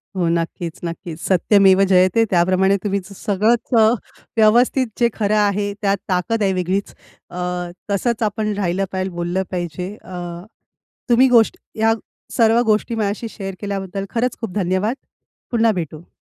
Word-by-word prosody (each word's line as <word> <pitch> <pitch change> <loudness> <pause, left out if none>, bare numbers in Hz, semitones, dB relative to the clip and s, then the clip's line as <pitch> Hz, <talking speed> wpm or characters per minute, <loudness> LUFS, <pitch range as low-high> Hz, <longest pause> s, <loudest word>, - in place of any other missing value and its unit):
हो. 180 -2 0
नक्कीच, 170 0 -2
नक्कीच. 170 -1 -6
सत्यमेव 195 +1 +4
जयते 185 +4 +4
त्याप्रमाणे 185 +2 +3
तुम्ही 200 -1 0
स - - -15
सगळंच 220 +4 +1
अ, 220 - +6 0.5
व्यवस्थित 240 +4 +4
जे 235 -1 +4
खरं 210 -1 0
आहे, 205 -1 +1
त्यात 200 -1 +2
ताकद 200 +5 0
आहे 195 -1 +2
वेगळीच. 185 +2 -2 0.4
अ, 175 - -9 0.5
तसंच 225 +3 0
आपण 215 0 -1
राहिलं 190 0 0
पाहिजे, 190 0 -2
बोललं 175 +2 -1
पाहिजे. 180 +2 -4
अ, 185 - -11 1.0
तुम्ही 245 +2 +6
गोष्टी 230 -2 +2
या 225 0 +4 0.4
सर्व 230 0 +4
गोष्टी 215 +1 +1
माझ्याशी 215 +1 -2
शेअर 195 -3 -6
केल्याबद्दल 195 -1 -4
खरंच 240 +2 -1
खूप 225 -6 -5
धन्यवाद. 190 +4 0 0.6
पुन्हा 230 -2 +3
भेटू. 160 -1 -6
200 Hz, 145 wpm, -20 LUFS, 185-220 Hz, 1.0 s, अ